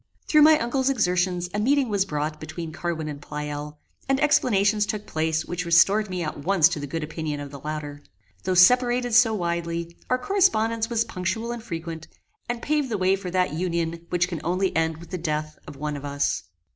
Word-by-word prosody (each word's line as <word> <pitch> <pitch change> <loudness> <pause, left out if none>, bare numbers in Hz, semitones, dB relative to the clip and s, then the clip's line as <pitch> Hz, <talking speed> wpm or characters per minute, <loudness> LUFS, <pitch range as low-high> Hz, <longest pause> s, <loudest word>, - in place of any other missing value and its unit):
Through 305 - +5
my 310 +1 +8
uncle's 260 +2 0
exertions 180 -6 +1
a 205 - -1
meeting 270 +4 +2
was 200 -3 +1
brought 150 -3 -2
about 155 - -18
between 160 +1 -6
Carwin 160 -1 -3
and 145 -1 -6
Pleyel, 150 0 -6 0.3
and 270 0 +2
explanations 210 -8 +3
took 210 -1 -3
place 160 0 -1
which 175 0 -3
restored 195 +5 +4
me 180 -1 -3
at 155 - -4
once 170 +1 +4
to 165 - -3
the 145 - -5
good 160 +3 -3
opinion 155 -1 -4
of 145 -1 -7
the 140 - -9
latter. 150 0 -5 0.4
Though 185 - 0
separated 245 +5 +4
so 225 -1 +5
widely 170 -2 -3
our 255 - +3
correspondence 230 - +1
was 230 -1 +1
punctual 220 +6 -3
and 240 -1 -5
frequent, 165 -5 -6 0.4
and 240 -1 -3
paved 295 -3 0
the 220 - -1
way 190 0 +3
for 190 -2 -6
that 180 -4 0
union 170 0 -2
which 175 0 +1
can 170 -4 -5
only 185 +3 0
end 160 -1 +1
with 170 +3 -13
the 185 - -3
death 155 -2 -3
of - - -9
one 150 +1 -4
of 145 - -7
us. 140 0 -1
175 Hz, 205 wpm, -25 LUFS, 155-220 Hz, 0.4 s, my